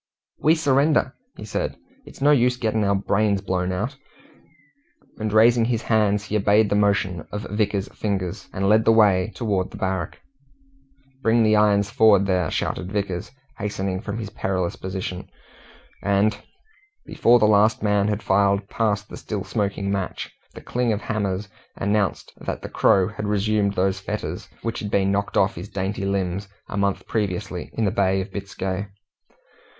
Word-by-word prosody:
"We 155 +2 +4
surrender," 145 -2 +2 0.2
he - - -8
said. - - -3 0.3
"It's - - -8
no 145 - +6
use 125 -3 +3
getting 110 -3 0
our 100 0 +2
brains 100 +1 +1
blown 95 -2 -1
out." 110 +9 -3 1.2
And 110 0 -2
raising 115 +2 +5
his 115 -1 -1
hands, 105 -2 +2
he 105 0 -4
obeyed 105 +1 +3
the - - +3
motion 100 -4 +1
of 105 0 -4
Vickers's 105 -2 -1
fingers, 95 -4 -3
and 95 +1 -1
led 110 +2 +5
the - - +6
way 105 -3 +4
towards 100 -6 -1
the - - -10
barrack. 95 -4 -3 1.0
"Bring 115 -1 +3
the 110 0 +4
irons 105 -1 +3
forward, 110 -4 +5
there!" 90 -4 +1
shouted 95 +1 -2
Vickers, 100 -4 -2 0.3
hastening 95 -2 -2
from 105 -1 -5
his 105 -3 -5
perilous 95 -4 -2
position; 95 -1 -5 0.7
and 100 +2 +2 0.7
before 120 +1 +4
the 110 - +3
last 105 +2 +4
man 105 -1 +2
had 105 +1 -2
filed 100 0 +2
past 105 -2 0
the - - -9
still 105 -3 -4
smoking 100 -2 -2
match, 95 -2 -4 0.2
the - - -9
cling 125 -1 -1
of 105 - -1
hammers 100 -2 -2 0.3
announced 100 -1 -1
that - - -5
the - - -5
Crow 95 -2 +3
had 105 0 -5
resumed 105 0 +1
those 95 +1 +1
fetters - - -5
which 115 0 -2
had 105 - -4
been 100 -1 +2
knocked 100 0 -1
off 100 +3 +3
his 105 - -8
dainty 95 +1 -3
limbs 100 0 -1 0.2
a - - -5
month 100 -1 0
previously 95 -3 -3
in 115 - 0
the 100 - +1
Bay 95 -1 +2
of 95 +1 -5
Biscay. 95 0 -4
100 Hz, 165 wpm, -23 LUFS, 95-110 Hz, 1.2 s, no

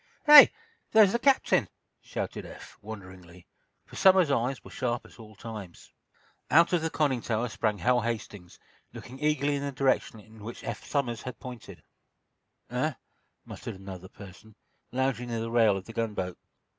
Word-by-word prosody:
"Hey! 295 -1 +11 0.4
There's 215 -3 +7
the 235 - 0
captain!" 275 +1 +3 0.3
shouted - - -5
Eph, - - -12
wonderingly, 95 -4 -11 0.4
for - - -15
Somers's 185 -5 +5
eyes 125 0 -1
were - - -13
sharp 120 -1 -3
at - - -17
all 110 -1 -13
times. 105 -5 -10 0.6
Out 170 +4 +5
of 175 - +2
the 160 - -1
conning 140 -6 0
tower 115 +1 -1
sprang 105 -1 -1
Hal 125 +3 +2
Hastings, 105 -6 -5 0.4
looking 130 +2 -10
eagerly 150 -1 +1
in - - -4
the 140 0 -3
direction 130 -4 0
in 110 0 -16
which 115 +2 -8
Eph - - -5
Somers 120 -6 -2 0.2
pointed: 125 -4 -10 0.9
"Eh?" - - -1 0.5
muttered - - -8
another 95 -1 -10
person, 100 +2 -14 0.4
lounging 125 -2 -1
near 115 -1 -2
the 115 0 -4
rail 110 -4 +4
of 95 - -8
the 115 - -10
gunboat. 105 -6 -3
115 Hz, 155 wpm, -28 LUFS, 105-140 Hz, 0.9 s, Hey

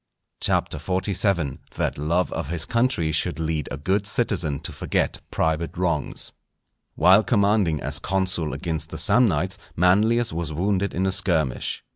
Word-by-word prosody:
CHAPTER 75 - +1
XLVII.—That 90 -5 -2
love 85 +5 0
of - - -4
his 80 0 -1
Country 115 -10 0
should 85 +3 0
lead 80 -2 -2
a - - -4
good 95 +7 0
Citizen 90 - 0
to - - -5
forget - - -2
private 80 0 -1
Wrongs. 85 -5 -2 0.6
While 95 +3 +6
commanding 100 -6 +2
as 70 +4 -1
consul 90 -3 -1
against 80 -2 -3
the - - -7
Samnites, 95 -5 +3 0.2
Manlius 105 +6 +3
was 85 -2 -3
wounded 95 +5 -1
in 95 +2 0
a 95 - +1
skirmish. 85 - 0
90 Hz, 140 wpm, -23 LUFS, 80-100 Hz, 0.6 s, While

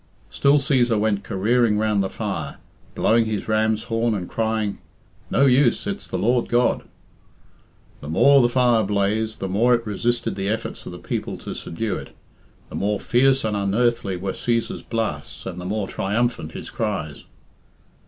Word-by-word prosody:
Still 140 +1 +4
Cæsar 125 -5 +2
went 105 -2 0
careering 110 +3 +2
round 105 -1 +1
the 95 - -1
fire, - - -4 0.4
blowing 115 +1 +3
his 110 -2 -3
ram's 110 0 +1
horn 115 -1 0
and 90 -3 -4
crying, 110 -2 -1 0.5
"No 140 - +3
use! 130 -1 +3
It's 200 0 -4
the - - -3
Lord 120 +2 +1
God!" 120 +1 +2 1.2
The 75 - -8
more 140 - +6
the 120 - +3
fire 120 -3 +3
blazed, 105 +2 0
the 95 - -4
more 115 +6 +3
it 115 0 -4
resisted 115 +1 -1
the 95 0 -3
efforts 110 +1 -4
of - - -6
the - - -8
people - - -4
to - - -7
subdue 100 +2 -3
it, - - -10 0.5
the - - -8
more 100 0 0
fierce 135 +4 +3
and 105 -1 0
unearthly 100 -1 0
were 95 +2 -3
Cæsar's 115 -1 -1
blasts 110 -10 -4
and 90 -1 -5
the - - -7
more 100 +1 -2
triumphant 105 -5 -1
his - - -7
cries. 75 -2 -3
110 Hz, 165 wpm, -23 LUFS, 100-120 Hz, 1.2 s, more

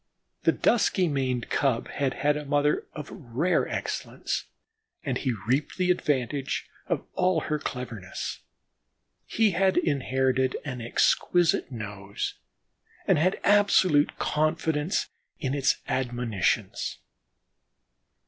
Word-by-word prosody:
The - - +6
dusky 200 -5 +2
maned 130 -5 -1
cub 130 -5 +1
had 135 -3 -1
had 150 +1 +2
a 150 - -3
mother 145 +1 +1
of 150 -1 -7
rare 155 +2 0
excellence - - -3 0.6
and 135 -5 -1
he 130 -4 -1
reaped 135 +4 0
the 180 -1 +3
advantage 140 -4 -1 0.2
of - - -1
all 180 -3 +2
her 150 0 -1
cleverness. 115 -9 -5 0.9
He 220 -2 +3
had 190 +2 +2
inherited 130 -4 +1
an 125 -4 -4
exquisite 165 +7 +2
nose 100 -4 -5 0.7
and - - +4
had 185 +4 +2
absolute 195 -7 +4
confidence 155 +1 0 0.3
in 135 -3 -1
its 140 -2 +2
admonitions. 120 -6 -1
145 Hz, 110 wpm, -27 LUFS, 125-160 Hz, 0.9 s, The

